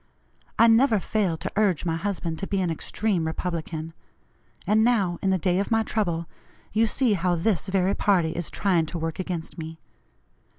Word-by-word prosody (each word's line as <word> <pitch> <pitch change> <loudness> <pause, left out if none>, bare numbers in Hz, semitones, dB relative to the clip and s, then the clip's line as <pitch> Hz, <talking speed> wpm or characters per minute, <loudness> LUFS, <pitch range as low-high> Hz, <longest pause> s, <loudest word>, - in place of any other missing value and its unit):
I 230 - +7
never 225 -1 +5
failed 185 -5 -1
to - - -3
urge 200 -6 +2
my 165 -1 0
husband 170 -3 -3
to 195 - -4
be 195 - -1
an 180 -3 0
extreme 180 +1 -1
Republican, 160 -1 -4 0.7
and 215 +3 +3
now, 200 -8 +2
in 195 - +1
the 190 - +3
day 180 0 +1
of 200 - -1
my 225 0 +2
trouble, 175 -7 -1 0.5
you 225 +1 +3
see 245 0 +2
how 180 -2 +1
this 185 +3 0
very 190 0 +1
party 180 -7 +2
is 170 -1 -3
trying 175 -6 +1
to 170 - -5
work 165 0 -4
against 175 -2 -4
me. 160 0 -7
185 Hz, 180 wpm, -25 LUFS, 165-210 Hz, 0.7 s, I